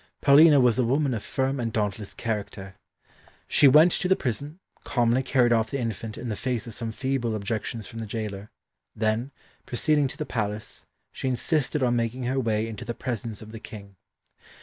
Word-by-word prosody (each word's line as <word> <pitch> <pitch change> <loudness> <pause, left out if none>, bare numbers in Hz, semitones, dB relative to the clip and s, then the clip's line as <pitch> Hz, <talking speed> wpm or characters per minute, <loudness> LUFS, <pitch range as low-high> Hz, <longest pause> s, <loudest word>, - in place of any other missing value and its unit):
Paulina 145 +1 +7
was 125 -2 +3
a - - +4
woman 135 +3 +1
of 110 - -3
firm 135 +3 -1
and 115 -2 -2
dauntless 105 -1 -3
character. 100 -3 -4 0.7
She 145 - +5
went 155 +6 +7
to 180 - +1
the 190 - +4
prison, 145 +4 -4 0.3
calmly 120 +1 +2
carried 125 -2 +3
off 110 -1 +1
the 140 - -2
infant 115 -2 -4
in 125 - -6
the 110 - -2
face 125 +1 -2
of 115 - -8
some 115 +1 -4
feeble 130 -2 -1
objections 110 +1 -3
from 115 - -8
the 110 - -5
gaoler, 105 -2 -5 0.5
then, 110 +4 0 0.4
proceeding 145 +3 +2
to 140 - -8
the 155 - -3
palace, 105 -4 -4 0.3
she - - -4
insisted 135 +2 0
on 120 -1 +2
making 120 +2 -2
her 130 +2 0
way 110 -3 0
into 115 +2 -7
the 120 0 -5
presence 115 -3 -5
of 110 - -12
the 110 - -8
King. 100 -3 -11
120 Hz, 190 wpm, -26 LUFS, 110-130 Hz, 0.7 s, Paulina